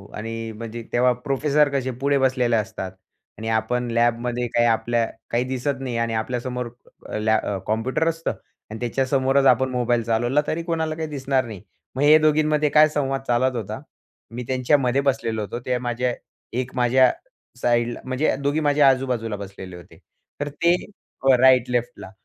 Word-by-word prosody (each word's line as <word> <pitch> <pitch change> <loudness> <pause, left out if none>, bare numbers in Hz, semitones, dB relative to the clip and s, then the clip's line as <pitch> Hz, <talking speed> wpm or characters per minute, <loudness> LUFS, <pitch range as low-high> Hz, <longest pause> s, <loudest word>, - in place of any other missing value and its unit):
आणि 115 +1 -5
म्हणजे 115 +1 -7
तेव्हा 125 +1 +4
प्रोफेसर 145 +3 +1
कसे 130 -1 -1
पुढे 140 0 +2
बसलेले 130 -3 +2
असतात 105 -3 -3 0.5
आणि 110 - -6
आपण 120 +2 0
लॅबमध्ये 120 +1 0
काही, 120 0 +2
आपल्या 115 0 +1 0.2
काही 120 +1 +1
दिसत 130 +1 -2
नाही 125 -3 -3
आणि 115 -1 -1
आपल्यासमोर 125 +2 -3 0.4
अ, - - -3
लॅ 110 +1 +2
अ, 100 - -2
कॉम्प्युटर 115 +9 0
असतं 165 0 -2 0.4
आणि 110 +1 -7
त्याच्यासमोरच 135 +2 +1
आपण 130 0 +4
मोबाईल 120 -2 0
चालवला, 120 +5 +1
तरी 165 +2 -2
कोणाला 160 -2 -2
काही 160 0 -4
दिसणार 135 -3 -1
नाही. 105 -5 -8 0.3
मग 130 - -2
हे 150 +1 +8
दोघींमध्ये 155 -1 +2
काय 155 +2 +6
संवाद 135 -3 -1
चालत 125 +1 +2
होता. 110 +3 -5 0.5
मी 125 +2 -5
त्यांच्यामध्ये 130 0 +2
बसलेलो 130 -5 -1
होतो. 105 +3 -5
ते 125 +1 -1
माझ्या 125 0 -1 0.4
एक 125 0 -2
माझ्या 125 0 +4 0.5
साइडला 120 0 +1
म्हणजे 130 +4 0
दोघी 145 +2 +1
माझ्या 145 -2 +4
आजूबाजूला 125 -5 -1
बसलेले 95 -2 -9
होते 90 -1 -14 0.4
तर 145 0 -2
ते. 170 +4 +2 0.5
हो 135 0 +6
राइट, 130 -2 +5
लेफ्टला. 120 -5 -3
125 Hz, 160 wpm, -23 LUFS, 115-135 Hz, 0.5 s, हे